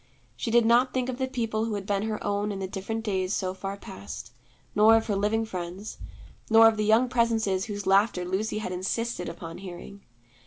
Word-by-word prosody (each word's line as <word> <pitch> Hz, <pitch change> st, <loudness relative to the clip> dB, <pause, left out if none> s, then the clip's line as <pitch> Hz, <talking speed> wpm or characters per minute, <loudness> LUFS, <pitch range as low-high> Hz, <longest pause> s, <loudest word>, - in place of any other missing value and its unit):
She 120 Hz, -, -3 dB
did 235 Hz, 0 st, +4 dB
not 245 Hz, +3 st, +4 dB
think 255 Hz, 0 st, 0 dB
of 255 Hz, 0 st, -4 dB
the 260 Hz, -, 0 dB
people 230 Hz, -4 st, -1 dB
who 225 Hz, -2 st, -2 dB
had 200 Hz, -1 st, -5 dB
been 200 Hz, -1 st, 0 dB
her 215 Hz, 0 st, -2 dB
own 205 Hz, +1 st, -1 dB
in 200 Hz, -, -4 dB
the 190 Hz, -1 st, -3 dB
different 210 Hz, +4 st, -4 dB
days 190 Hz, -2 st, 0 dB
so 185 Hz, -1 st, -1 dB
far 195 Hz, +1 st, -5 dB
past, 95 Hz, -, -9 dB, 0.4 s
nor 215 Hz, +2 st, +6 dB
of 225 Hz, -, -1 dB
her 210 Hz, -, -1 dB
living 210 Hz, +3 st, +1 dB
friends, 185 Hz, 0 st, -6 dB, 0.5 s
nor 225 Hz, 0 st, +8 dB
of 225 Hz, -, +3 dB
the 215 Hz, 0 st, -1 dB
young 220 Hz, +4 st, +4 dB
presences 225 Hz, -5 st, +1 dB
whose 205 Hz, -2 st, -5 dB
laughter 195 Hz, -1 st, +3 dB
Lucy 195 Hz, +4 st, -1 dB
had 215 Hz, -4 st, -3 dB
insisted 185 Hz, +2 st, -2 dB
upon 165 Hz, 0 st, -8 dB
hearing. 190 Hz, +2 st, -9 dB
210 Hz, 205 wpm, -27 LUFS, 190-225 Hz, 0.5 s, nor